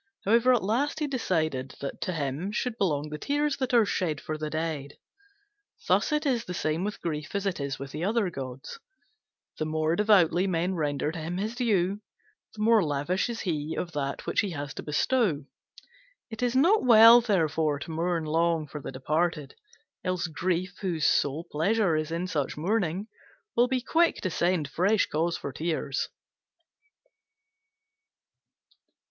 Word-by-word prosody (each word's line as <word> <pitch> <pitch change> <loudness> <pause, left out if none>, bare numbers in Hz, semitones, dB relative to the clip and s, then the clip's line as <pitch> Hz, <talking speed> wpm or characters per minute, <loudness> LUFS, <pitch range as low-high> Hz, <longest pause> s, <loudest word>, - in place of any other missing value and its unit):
However, 235 +5 +4
at 245 -5 +3
last 255 +10 0
he 305 - 0
decided 155 - -1
that 140 - -6
to - - -1
him 150 +5 -3
should 230 +2 -2
belong 150 -6 0
the 150 0 -6
tears 290 - 0
that 260 -2 -2
are 235 -3 +5
shed 165 -7 -1
for 155 - -5
the 155 0 -4
dead. 155 -3 -4 0.9
Thus - - +2
it 300 +1 0
is 245 -4 +1
the 180 - -5
same 155 +2 -1
with 210 +1 -3
Grief 155 +1 -4
as 200 0 -1
it 195 -4 -1
is 140 -1 -3
with 135 0 -7
the 155 +4 -5
other 205 -1 +1
gods. 135 - -7 0.8
The 155 - 0
more 155 +1 0
devoutly 190 -3 +4
men 180 +1 0
render 150 -3 -1
to 165 - -6
him 165 +3 -4
his 215 +4 -2
due, 205 -5 0 0.5
the 215 - -3
more 225 -2 +5
lavish 150 +8 -1
is 235 - -4
he 155 -3 -2
of 175 - -3
that 140 -3 -3
which - - 0
he 205 - +1
has 145 -2 -5
to - - -6
bestow. 155 - +1 0.9
It 220 - -7
is 245 0 0
not 355 +11 +4
well, 230 0 +9
therefore, 160 -8 +1
to 145 +4 -7
mourn 165 0 -1
long 165 0 +1
for 150 0 -8
the - - -6
departed; 150 +2 -1 0.5
else 185 -1 -1
Grief, 180 +2 -2
whose 170 -6 -1
sole 145 +3 +2
pleasure 185 +3 +2
is 155 0 -1
in 170 +2 -2
such 150 -7 -2
mourning, 185 +1 0 0.5
will 240 +1 +4
be 255 0 0
quick 330 +6 +2
to 185 - -2
send 170 -3 +1
fresh 195 +9 +2
cause 165 +2 -1
for 140 - -6
tears. 155 -2 -2
175 Hz, 170 wpm, -27 LUFS, 155-215 Hz, 0.9 s, well